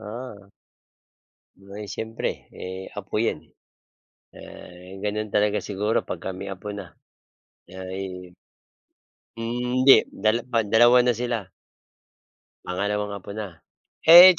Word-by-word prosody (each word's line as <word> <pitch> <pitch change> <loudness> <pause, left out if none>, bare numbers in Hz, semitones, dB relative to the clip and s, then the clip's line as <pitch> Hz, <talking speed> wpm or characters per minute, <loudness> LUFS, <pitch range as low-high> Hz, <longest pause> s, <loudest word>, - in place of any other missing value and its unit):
Oo. 105 -2 -8 1.1
Aba'y 100 +2 -9
siyempre 110 +3 -4
eh, 95 +1 -7
apo 100 +1 -2
yan 80 -8 -1
eh. - - -29 0.8
Ah, 90 +2 -11
ganon 105 0 -2
talaga 105 0 +2
siguro 105 +2 0
pagka 90 +1 -5
may 100 +1 -6
apo 95 +2 -8
na. 95 -4 -8 0.8
Ayun, 95 -1 -7 1.1
hmm 120 +2 -2
hindi 135 +1 +8
dala 110 +3 +1
ban 115 -4 0
2 120 +3 +7
na 125 0 +3
sila. 115 -5 -3 1.2
Pangalawang 105 +2 -1
apo 100 +1 -9
na. 100 -6 -6 0.5
Eh, 175 +2 +11
105 Hz, 115 wpm, -25 LUFS, 95-115 Hz, 1.2 s, Eh